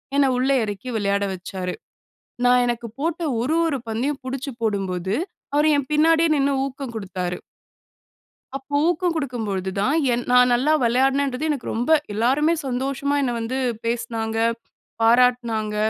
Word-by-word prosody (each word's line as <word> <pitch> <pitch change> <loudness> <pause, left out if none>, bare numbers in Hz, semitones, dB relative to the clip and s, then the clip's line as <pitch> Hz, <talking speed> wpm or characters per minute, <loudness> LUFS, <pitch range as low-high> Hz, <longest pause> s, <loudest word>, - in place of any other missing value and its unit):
என்ன 280 -1 +4
உள்ள 255 +2 +1
இறக்கி 205 +3 -5
விளையாட 200 -1 0
வச்சாரு. 185 0 -5 0.7
நான், 250 0 +5
எனக்கு 240 -1 -2
போட்ட 330 +3 -2 0.2
ஒரு 280 +7 0
ஒரு 290 -4 -1
பந்தையும் 265 +6 -2
புடிச்சு 270 +1 -4
போடும்போது, 190 -3 -1 0.4
அவரு 295 +1 +4
என் 285 -1 -3
பின்னாடியே 325 +2 +4
நின்னு 280 -1 +2
ஊக்கம் 270 -2 -6
குடுத்தாரு. 185 -4 -4 1.2
அப்ப 285 +2 -2
ஊக்கம் 350 0 +1
குடுக்கும் 250 -7 -3
பொழுது 190 -1 -2
தான், 260 +9 +2 0.2
என் 240 0 -2
நான் 250 0 +6
நல்லா 265 +6 +3
வெளையாடுனேன்றது 270 +4 +1
எனக்கு 285 -5 -2
ரொம்ப 240 +7 -1 0.2
எல்லாருமே 265 +9 +2
சந்தோஷமா 270 +2 -1
என்னை 250 -3 0
வந்து 230 +3 -3 0.3
பேசுனாங்க, 230 -1 -2 0.7
பாராட்டுனாங்க, 230 -2 +3
250 Hz, 135 wpm, -22 LUFS, 220-280 Hz, 1.2 s, நான்